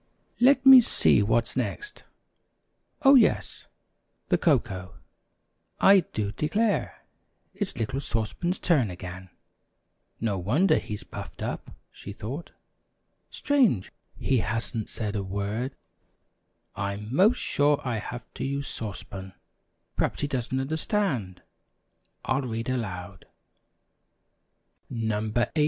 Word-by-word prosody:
"Let 265 Hz, +1 st, +5 dB
me 265 Hz, -1 st, +11 dB
see 225 Hz, -, +3 dB
what's 115 Hz, +3 st, +1 dB
next. 415 Hz, -, -4 dB, 1.0 s
Oh, 275 Hz, 0 st, +8 dB
yes, 250 Hz, -6 st, +3 dB, 0.6 s
the -, -, +4 dB
cocoa. 95 Hz, -2 st, 0 dB, 0.8 s
I 195 Hz, 0 st, +7 dB
do 105 Hz, -, -3 dB
declare, 205 Hz, -, -1 dB, 0.5 s
it's 200 Hz, -4 st, -4 dB
little 120 Hz, +4 st, -2 dB
Sauce 110 Hz, -5 st, -2 dB
Pan's 180 Hz, +1 st, -2 dB
turn 140 Hz, -, +2 dB
again. 90 Hz, +1 st, -8 dB, 0.9 s
No 105 Hz, -4 st, -1 dB
wonder 135 Hz, -, +3 dB
he's 105 Hz, -1 st, -6 dB
puffed -, -, -8 dB
up," -, -, -4 dB, 0.2 s
she 100 Hz, -, -9 dB
thought. 130 Hz, +11 st, -6 dB, 0.8 s
"Strange, 245 Hz, -, +2 dB, 0.3 s
he 130 Hz, -2 st, +1 dB
hasn't 110 Hz, 0 st, -2 dB
said 105 Hz, -2 st, -4 dB
a 100 Hz, -, 0 dB
word. 100 Hz, +7 st, -3 dB, 1.0 s
I'm 100 Hz, +3 st, -4 dB
'most 205 Hz, +9 st, +5 dB
sure 145 Hz, 0 st, +2 dB
I 115 Hz, -3 st, -1 dB
have 120 Hz, +2 st, -7 dB
to -, -, -5 dB
use 140 Hz, +1 st, -2 dB
Sauce 105 Hz, -5 st, -5 dB
Pan. 95 Hz, -1 st, -9 dB, 0.6 s
Perhaps -, -, 0 dB
he 145 Hz, -, 0 dB
doesn't 130 Hz, -2 st, -2 dB
understand. 140 Hz, -, -1 dB, 0.8 s
I'll 130 Hz, +1 st, +1 dB
read 115 Hz, -2 st, -4 dB
aloud: 95 Hz, -6 st, -4 dB, 1.6 s
NO. 110 Hz, -2 st, -2 dB
18. 120 Hz, -, +3 dB
120 Hz, 115 wpm, -27 LUFS, 105-155 Hz, 1.6 s, me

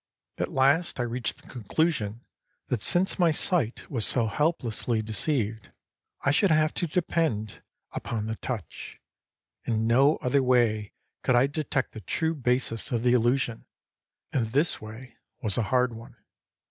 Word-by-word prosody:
At -, -, -2 dB
last 140 Hz, +4 st, +2 dB
I -, -, +1 dB
reached 120 Hz, -2 st, -4 dB
the -, -, -18 dB
conclusion 120 Hz, -, -2 dB, 0.4 s
that 125 Hz, -5 st, -1 dB
since 180 Hz, -, +3 dB
my 175 Hz, -2 st, +5 dB
sight 155 Hz, -, +1 dB
was 120 Hz, -6 st, -1 dB
so 120 Hz, +1 st, +2 dB
helplessly 115 Hz, -3 st, -1 dB
deceived, 110 Hz, -1 st, -1 dB, 0.5 s
I 135 Hz, -, +2 dB
should 195 Hz, +7 st, +3 dB
have 155 Hz, 0 st, +3 dB
to 175 Hz, -, -1 dB
depend 160 Hz, -, -1 dB, 0.3 s
upon 110 Hz, -3 st, -4 dB
the 110 Hz, 0 st, -4 dB
touch. 115 Hz, -8 st, -6 dB, 0.6 s
In 110 Hz, -1 st, -1 dB
no 135 Hz, +6 st, +4 dB
other 130 Hz, +2 st, +1 dB
way 120 Hz, -5 st, +2 dB, 0.3 s
could 130 Hz, -, +2 dB
I 120 Hz, +2 st, +5 dB
detect 145 Hz, -2 st, -2 dB
the 110 Hz, -, -9 dB
true 160 Hz, -, -1 dB
basis 125 Hz, -5 st, 0 dB
of 120 Hz, -2 st, -1 dB
the 125 Hz, 0 st, +4 dB
illusion; 120 Hz, -1 st, +1 dB, 0.7 s
and 120 Hz, -4 st, +1 dB
this 145 Hz, +9 st, 0 dB
way 115 Hz, +3 st, -11 dB, 0.3 s
was 105 Hz, -3 st, +1 dB
a 110 Hz, -, -1 dB
hard 125 Hz, -1 st, +2 dB
one. 115 Hz, +1 st, -11 dB
125 Hz, 150 wpm, -27 LUFS, 110-145 Hz, 0.7 s, my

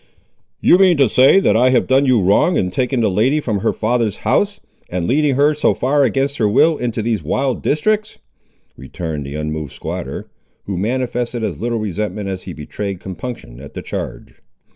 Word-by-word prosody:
"You 180 Hz, -, +5 dB
mean 185 Hz, -4 st, +5 dB
to 135 Hz, -2 st, +4 dB
say 130 Hz, -, +5 dB
that 110 Hz, -, +2 dB
I 125 Hz, +3 st, +4 dB
have 130 Hz, -1 st, +3 dB
done 135 Hz, +1 st, +3 dB
you 120 Hz, -6 st, +3 dB
wrong, 100 Hz, -, +3 dB
in 90 Hz, -1 st, 0 dB
taking 125 Hz, +4 st, 0 dB
the 110 Hz, -, +3 dB
lady 125 Hz, +10 st, +2 dB
from 110 Hz, -8 st, -2 dB
her 110 Hz, -, +1 dB
father's 115 Hz, -1 st, -1 dB
house, 200 Hz, -, +1 dB, 0.3 s
and 90 Hz, -1 st, -2 dB
leading 145 Hz, +1 st, +2 dB
her 145 Hz, +3 st, +3 dB
so 150 Hz, -, +1 dB
far 140 Hz, +3 st, +2 dB
against 135 Hz, +3 st, 0 dB
her 105 Hz, -3 st, +2 dB
will 160 Hz, +10 st, +4 dB
into 120 Hz, -5 st, -3 dB
these 110 Hz, -4 st, -1 dB
wild 130 Hz, -, -1 dB
districts," 215 Hz, +8 st, 0 dB, 0.6 s
returned 75 Hz, 0 st, -6 dB
the 70 Hz, -, -6 dB
unmoved 75 Hz, -1 st, -4 dB
squatter, -, -, -6 dB, 0.4 s
who 100 Hz, -, -4 dB
manifested 120 Hz, +3 st, -2 dB
as -, -, -3 dB
little 120 Hz, 0 st, -1 dB
resentment 105 Hz, -1 st, -3 dB
as 95 Hz, -1 st, -4 dB
he 90 Hz, -, -8 dB
betrayed 95 Hz, +5 st, -5 dB
compunction 95 Hz, -, -8 dB
at 70 Hz, +1 st, -12 dB
the -, -, -6 dB
charge. -, -, -6 dB
115 Hz, 185 wpm, -18 LUFS, 95-135 Hz, 0.6 s, You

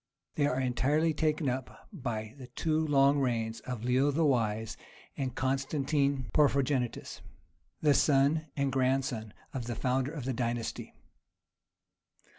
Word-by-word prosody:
They 145 Hz, -1 st, +2 dB
are 130 Hz, -2 st, 0 dB
entirely 140 Hz, +6 st, +1 dB
taken 155 Hz, 0 st, 0 dB
up 130 Hz, 0 st, -4 dB
by 110 Hz, -4 st, -4 dB
the 130 Hz, -, -9 dB
two 155 Hz, +4 st, 0 dB
long 140 Hz, 0 st, +4 dB
reigns 115 Hz, -4 st, -1 dB
of 125 Hz, -3 st, -6 dB
Leo 130 Hz, +3 st, +3 dB
the 155 Hz, +3 st, +2 dB
Wise 110 Hz, -5 st, 0 dB, 0.4 s
and 130 Hz, -3 st, -3 dB
Constantine 135 Hz, +1 st, 0 dB
Porphyrogenitus,(25) 140 Hz, -4 st, +1 dB, 0.6 s
the 150 Hz, -2 st, +5 dB
son 145 Hz, +3 st, +3 dB
and 140 Hz, -1 st, +1 dB
grandson 130 Hz, -4 st, 0 dB, 0.2 s
of 125 Hz, -4 st, -4 dB
the 120 Hz, -, -3 dB
founder 130 Hz, +2 st, 0 dB
of 150 Hz, -6 st, -6 dB
the 130 Hz, -, -1 dB
dynasty. 120 Hz, -1 st, -3 dB
135 Hz, 130 wpm, -30 LUFS, 125-145 Hz, 0.6 s, the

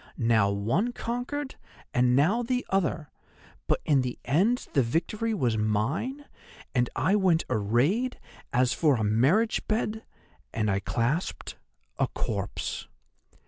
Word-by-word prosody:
Now 115 Hz, -5 st, +3 dB
one 115 Hz, -, 0 dB
conquered, 250 Hz, +5 st, -4 dB, 0.4 s
and 125 Hz, 0 st, +3 dB
now 180 Hz, -, +3 dB
the 250 Hz, +1 st, -1 dB
other; 170 Hz, -5 st, 0 dB, 0.6 s
but -, -, +1 dB
in 140 Hz, -3 st, +4 dB
the 125 Hz, -1 st, -3 dB
end 195 Hz, -, +2 dB
the 140 Hz, -, +4 dB
victory 170 Hz, -, -1 dB
was 125 Hz, -, 0 dB
mine, 130 Hz, -, -1 dB, 0.5 s
and 125 Hz, -2 st, +2 dB
I 195 Hz, -, +2 dB
went 185 Hz, -5 st, +3 dB
arrayed 135 Hz, -, +1 dB, 0.3 s
as 125 Hz, +1 st, +2 dB
for 150 Hz, -4 st, +3 dB
a 110 Hz, -, -1 dB
marriage 135 Hz, -, +2 dB
bed—and 215 Hz, -, -3 dB
I 95 Hz, -, +1 dB
clasped 120 Hz, -, -2 dB, 0.4 s
a -, -, +3 dB
corpse. -, -, -4 dB
150 Hz, 125 wpm, -27 LUFS, -, 0.6 s, in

